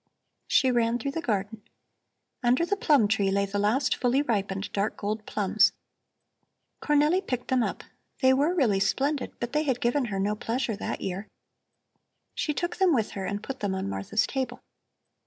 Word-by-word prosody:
She 260 -1 +4
ran 235 -1 +2
through 275 +4 -3
the 330 - -3
garden. 210 -4 -2 0.8
Under 250 +6 +3
the 405 - 0
plum 290 - +3
tree 205 -2 +1
lay 200 +1 +1
the 200 +1 -3
last 220 +7 +2
fully 255 +3 +1
ripened 195 -5 -2
dark 200 +2 -1
gold 215 +1 -3
plums. 210 +1 +3 1.1
Cornelli 300 +5 +3
picked 250 -1 -3
them 260 -1 +3
up; - - -2 0.4
they 260 -1 +5
were 295 +7 +2
really 230 - +2
splendid, 280 +7 0
but 240 +2 -4
they 300 - +2
had 265 -5 0
given 245 +3 +1
her 195 -4 -3
no 205 +2 +1
pleasure 230 +1 -2
that - - -4
year. 190 +3 -4 1.1
She 310 - -1
took 345 +4 -3
them 370 -5 +4
with 220 -4 0
her 195 -1 -5
and 200 +1 -3
put 270 0 -6
them 200 -2 -1
on 190 - -3
Martha's 100 - 0
table. 265 -2 -3
240 Hz, 175 wpm, -27 LUFS, 205-275 Hz, 1.1 s, they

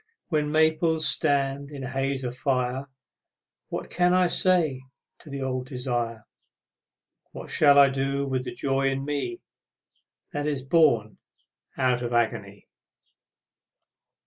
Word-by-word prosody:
When 150 -3 0
maples 160 +1 +2
stand 140 0 +1
in 140 -2 -8
a 125 - -5
haze 135 0 -2
of 125 -1 -4
fire 130 +1 -1 0.8
What - - -5
can 180 0 +2
I 185 0 +4
say 170 -7 +2 0.4
to - - -14
the 140 -1 -5
old 130 -1 -3
desire, 120 -4 -3 1.1
What - - -8
shall 145 -2 +5
I 140 -1 +7
do 135 +1 -1
with 130 -1 -2
the - - -4
joy 135 0 0
in 135 0 -3
me 145 - -3 0.9
That 145 0 -3
is 140 -3 -2
born 120 -8 +2 0.6
out 125 -2 +1
of 120 0 -3
agony? 105 -4 -2
135 Hz, 130 wpm, -25 LUFS, 130-150 Hz, 1.1 s, I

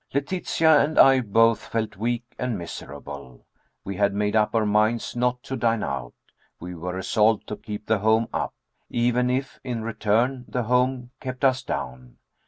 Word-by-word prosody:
Letitia 160 0 +3
and 155 +2 0
I 135 -1 +7
both 115 0 +3
felt 110 -2 -2
weak 120 +3 -1 0.2
and 125 -4 -1
miserable. 70 -6 -9 0.4
We 100 -1 -5
had 100 -1 +2
made 105 +1 0
up 110 +1 +2
our 110 -1 +3
minds 110 +3 +1
not 125 0 0
to 135 - -4
dine 115 -3 +1
out. 65 -3 -4 0.4
We 90 +1 -7
were 90 +2 -5
resolved 105 +3 +2
to 105 - -3
keep 105 -1 -7
the 110 -2 +1
home 110 +2 +3
up, - - -2 0.3
even 125 +1 +1
if, 130 +2 -2
in 120 -3 -3
return, 115 +3 0
the 125 - -2
home 125 +1 +1
kept 130 +1 -3
us 130 -1 +3
down. 65 - -6
115 Hz, 170 wpm, -24 LUFS, 105-125 Hz, 0.4 s, I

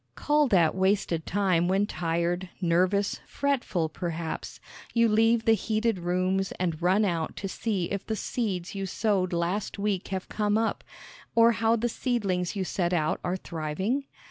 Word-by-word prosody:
Call 295 0 +2
that 175 -8 +4
wasted 190 -3 +1
time 185 -4 +2
when 195 +2 +2
tired, 175 0 -1
nervous, 185 +3 +1
fretful 250 - 0
perhaps, 165 0 -5 0.4
you 230 0 +5
leave 225 +1 +3
the 225 - +6
heated 220 0 0
rooms 185 +2 0
and 170 -3 -2
run 190 +5 +3
out 170 -4 -1
to 195 - -4
see 195 -2 -2
if 200 0 -3
the 220 - -1
seeds 195 -6 -3
you 195 -1 -3
sowed 190 -2 0
last 175 +5 -1
week 200 -2 -1
have 190 -1 -4
come 210 0 0
up, 225 0 -1 0.5
or 230 0 +7
how 225 0 +2
the 235 +1 0
seedlings 205 -8 -1
you 195 - -1
set 180 -1 -1
out 155 -3 +1
are 180 +1 -1
thriving? 190 - -2
190 Hz, 160 wpm, -27 LUFS, 175-220 Hz, 0.5 s, or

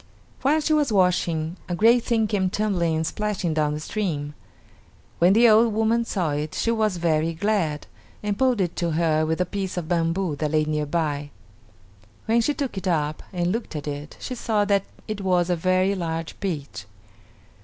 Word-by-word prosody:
While 300 +4 +3
she 310 +1 +1
was 295 -5 +2
washing 175 -3 +1
a 175 - -1
great 230 +5 +4
thing 225 -2 +1
came 200 -3 0
tumbling 180 -5 0
and 160 +1 0
splashing 190 -1 -2
down 150 -1 +1
the - - -4
stream. 155 -5 -3 0.9
When 175 +3 +5
the 235 +3 +6
old 225 0 +5
woman 225 +1 +2
saw 180 -8 -1
it 150 +1 -3
she 230 - +1
was 215 -5 +1
very 165 -1 +1
glad, 170 -6 0 0.4
and 205 -1 -1
pulled 255 -2 +2
it 175 -2 -1
to 170 -2 0
her 155 -1 +2
with 160 +2 -1
a 180 - +2
piece 190 0 -4
of 170 -3 -3
bamboo 170 0 0
that 150 +1 -1
lay 155 0 +2
near 150 -1 -1
by. 145 -2 -1 1.0
When 230 +1 +3
she 290 +5 0
took 270 -9 -3
it 190 - -6
up 155 -3 0
and 175 -2 0
looked 225 -5 -4
at 150 -1 -5
it 145 +1 -6
she 255 - -5
saw 220 -4 0
that 200 -1 +2 0.2
it 215 -2 -4
was 180 -2 +1
a - - +3
very 185 +3 +2
large 165 -3 -4
peach. 150 - -4
180 Hz, 190 wpm, -24 LUFS, 160-215 Hz, 1.0 s, the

